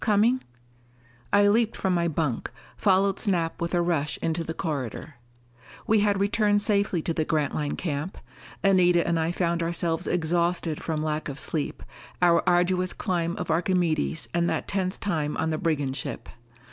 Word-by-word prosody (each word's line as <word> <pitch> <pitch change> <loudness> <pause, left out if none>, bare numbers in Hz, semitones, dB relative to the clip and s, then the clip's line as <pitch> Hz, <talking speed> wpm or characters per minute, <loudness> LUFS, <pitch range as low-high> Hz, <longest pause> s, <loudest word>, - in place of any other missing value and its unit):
"Coming 225 +4 +3 0.5
" 120 0 -31
I 205 0 +5
leaped 225 +2 +2
from 190 - 0
my 170 -1 +1
bunk, 150 -6 -1 0.3
followed 195 0 +2
Snap 170 -6 -1
with 170 +1 -1
a 175 - +2
rush 155 -4 0
into 165 +1 -1
the 160 0 -5
corridor. 140 -2 -4 0.7
We 220 0 +3
had 205 -1 +2
returned 205 0 +2
safely 200 -6 +1
to 165 - -1
the 160 - 0
Grantline 150 -1 -1
camp. 155 +1 -4 0.5
Anita 180 -3 +4
and 170 -1 +1
I 160 +1 0
found 170 -1 0
ourselves 170 0 -1
exhausted 170 -1 0
from 155 -2 -2
lack 155 -1 -2
of 140 - -6
sleep, 150 -2 -2 0.4
our 170 -1 +4
arduous 180 +1 +2
climb 170 -3 -1
of - - -3
Archimedes 165 - 0
and 170 0 +1
that 160 - -2
tense 190 -1 -1
time 155 -7 -2
on 160 - 0
the 155 - -2
brigand 145 -7 0
ship. 135 - -5
170 Hz, 165 wpm, -26 LUFS, 155-190 Hz, 0.7 s, I